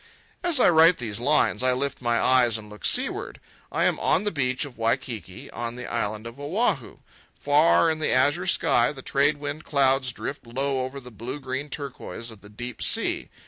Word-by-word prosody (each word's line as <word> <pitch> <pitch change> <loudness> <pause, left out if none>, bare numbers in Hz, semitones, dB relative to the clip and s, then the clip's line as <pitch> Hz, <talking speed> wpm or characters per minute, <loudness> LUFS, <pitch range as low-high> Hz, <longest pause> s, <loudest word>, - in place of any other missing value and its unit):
As 345 -6 +3
I - - +6
write 165 +1 +6
these 115 -3 -4
lines 145 +3 +2
I 130 0 +2
lift 140 +1 -3
my 120 -1 +1
eyes 125 -3 +3
and 105 -1 -11
look 105 - -8
seaward. - - +1 0.3
I - - 0
am - - +1
on 180 - +2
the 205 - 0
beach 130 -2 -1
of 135 -4 -11
Waikiki 115 -4 -3
on 120 0 -4
the 125 0 -7
island 110 -1 -3
of 115 +4 -9
Oahu. 180 +12 -1 0.4
Far, 150 +3 +4
in 155 - -3
the 155 - 0
azure 145 +8 +2
sky, 120 -8 +3
the 135 -3 -10
trade 145 +2 +2
wind 145 +1 -5
clouds 135 -2 +2
drift 130 +1 -7
low 135 +2 -1
over 130 +2 -6
the 125 -2 -12
blue 120 +6 -6
green 135 +2 -4
turquoise 130 -4 -6
of 110 - -14
the 105 - -14
deep 120 +2 -8
sea. - - +1
130 Hz, 195 wpm, -25 LUFS, 120-145 Hz, 0.4 s, I